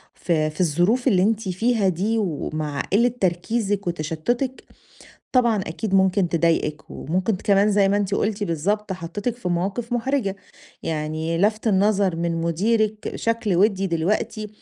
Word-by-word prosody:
في 155 Hz, -3 st, 0 dB
في 155 Hz, -, -4 dB
الظروف 175 Hz, -, +2 dB
اللي 185 Hz, -2 st, +4 dB
أنتِ 215 Hz, -2 st, 0 dB
فيها 220 Hz, +2 st, +1 dB
دي 205 Hz, +6 st, 0 dB
ومع 155 Hz, -6 st, -2 dB
قلة 235 Hz, +3 st, +3 dB
تركيزِك 200 Hz, +2 st, 0 dB
وتشتتِك 175 Hz, -, -2 dB, 0.7 s
طبعًا 240 Hz, -4 st, +3 dB
أكيد 195 Hz, +5 st, -3 dB
ممكن 190 Hz, -1 st, +3 dB
تضايقِك 165 Hz, -2 st, 0 dB
وممكن 185 Hz, +6 st, -1 dB
كمان 200 Hz, +2 st, +3 dB
زي 200 Hz, -1 st, +3 dB
ما 200 Hz, -, +2 dB
أنتِ 200 Hz, -1 st, 0 dB
قلتِ 210 Hz, 0 st, -1 dB
بالضبط، 195 Hz, +5 st, -1 dB
حطيتِك 195 Hz, +7 st, -4 dB
في 240 Hz, -7 st, -4 dB
مواقف 200 Hz, +8 st, -2 dB
محرجة، 240 Hz, -5 st, 0 dB, 0.5 s
يعني 160 Hz, +1 st, -2 dB
لفت 215 Hz, +4 st, +1 dB
النظر 200 Hz, -3 st, +2 dB
من 170 Hz, 0 st, -1 dB
مديرِك 215 Hz, +5 st, 0 dB
شكل 230 Hz, -5 st, 0 dB
ودي 195 Hz, 0 st, +2 dB
دلوقتي 195 Hz, +5 st, -1 dB
195 Hz, 140 wpm, -23 LUFS, 170-215 Hz, 0.7 s, اللي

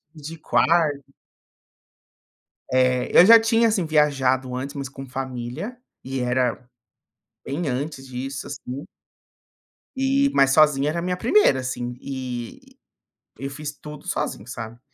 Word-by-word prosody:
de 155 Hz, +2 st, -8 dB
quar 165 Hz, 0 st, +3 dB, 1.8 s
É. 125 Hz, -1 st, +2 dB
Eu 175 Hz, -, +10 dB
já 230 Hz, +2 st, +10 dB
tinha, 225 Hz, +1 st, +3 dB
assim, 210 Hz, -5 st, 0 dB
viajado 135 Hz, -5 st, +1 dB
antes, 135 Hz, +3 st, -5 dB
mas 140 Hz, -2 st, -5 dB
com 135 Hz, 0 st, -9 dB
família 130 Hz, -, -5 dB, 0.3 s
e 130 Hz, 0 st, -4 dB
era 125 Hz, 0 st, 0 dB, 0.8 s
bem 145 Hz, +3 st, -3 dB
antes 135 Hz, +1 st, -4 dB
disso, 130 Hz, +2 st, -5 dB
assim 135 Hz, 0 st, -7 dB, 1.1 s
e, 275 Hz, +1 st, +2 dB
mas 135 Hz, 0 st, +5 dB
sozinha 150 Hz, -1 st, +4 dB
era 170 Hz, -, -3 dB
a -, -, -2 dB
minha 180 Hz, +1 st, -1 dB
1ª, 235 Hz, -, +3 dB
assim, 125 Hz, -1 st, -4 dB
e 130 Hz, -, -7 dB, 0.6 s
eu 135 Hz, 0 st, -5 dB
fiz 150 Hz, +1 st, -6 dB
tudo 150 Hz, 0 st, -11 dB
sozinho, 100 Hz, -, -3 dB
sabe. 120 Hz, -1 st, -7 dB
135 Hz, 130 wpm, -23 LUFS, 130-165 Hz, 1.8 s, Eu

